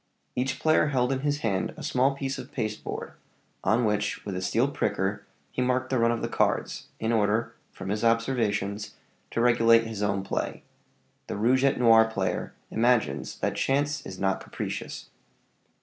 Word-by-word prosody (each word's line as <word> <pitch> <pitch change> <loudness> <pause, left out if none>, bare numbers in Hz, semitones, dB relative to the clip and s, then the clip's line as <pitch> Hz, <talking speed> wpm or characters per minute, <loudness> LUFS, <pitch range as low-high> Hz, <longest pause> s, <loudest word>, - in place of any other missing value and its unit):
Each 130 +1 -1
player 155 -1 +3
held 130 -3 +1
in 135 - 0
his 145 +1 -1
hand 95 -5 -1
a - - -8
small 130 +2 +2
piece 135 -1 -3
of - - -9
pasteboard, 110 -4 -4 0.5
on 115 +2 +3
which, 105 -1 -1
with 100 -2 -4
a 90 - -3
steel 115 +7 +2
pricker, 105 -5 -1 0.2
he - - -2
marked 130 +1 0
the 130 - +2
run 115 0 +4
of 120 - -2
the - - 0
cards, - - 0
in 110 +1 0
order, 110 0 +1 0.2
from - - -7
his 105 +2 -1
observations, 115 -4 0 0.3
to 115 - -1
regulate 115 -1 +5
his 110 -2 -5
own 100 -1 0
play: 95 - -3 0.6
the - - -4
rouge 125 +5 +3
et 140 - +3
noir 115 -2 +7
player 100 -4 -2 0.2
imagines 110 - +1
that - - 0
chance 145 +2 0
is 95 - -8
not 95 0 0
capricious. - - -6
115 Hz, 170 wpm, -27 LUFS, 105-130 Hz, 0.6 s, noir